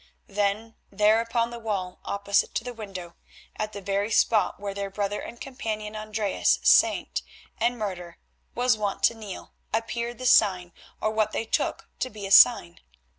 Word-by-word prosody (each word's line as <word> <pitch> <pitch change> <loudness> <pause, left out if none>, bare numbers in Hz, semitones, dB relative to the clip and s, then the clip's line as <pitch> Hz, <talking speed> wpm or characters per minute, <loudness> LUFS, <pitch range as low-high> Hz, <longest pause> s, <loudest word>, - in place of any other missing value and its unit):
Then, 205 +2 -1 0.2
there 210 +2 +3
upon 230 0 -1
the 235 - -7
wall 195 -5 -4
opposite 200 0 0
to - - -1
the 245 0 -6
window, 195 -6 -8 0.4
at 215 0 -3
the 200 -2 -8
very 200 +2 -1
spot 220 -2 +2
where 200 0 -4
their 200 0 -4
brother 205 +1 -2
and 235 - -9
companion, 220 -5 -5
Andreas, 215 -1 0
saint - - +4 0.4
and 240 +2 +1
martyr, 180 -5 -5 0.4
was 245 -1 +3
wont 200 -1 -2
to 235 - +5
kneel, 215 -4 -9 0.2
appeared 235 +2 -2
the 255 - -7
sign, 180 -7 +4 0.3
or 215 - 0
what 215 -1 0
they 225 - -2
took - - -1
to 255 - -1
be 210 -4 -8
a 195 - -6
sign. 195 -5 +6
215 Hz, 170 wpm, -26 LUFS, 200-225 Hz, 0.4 s, sign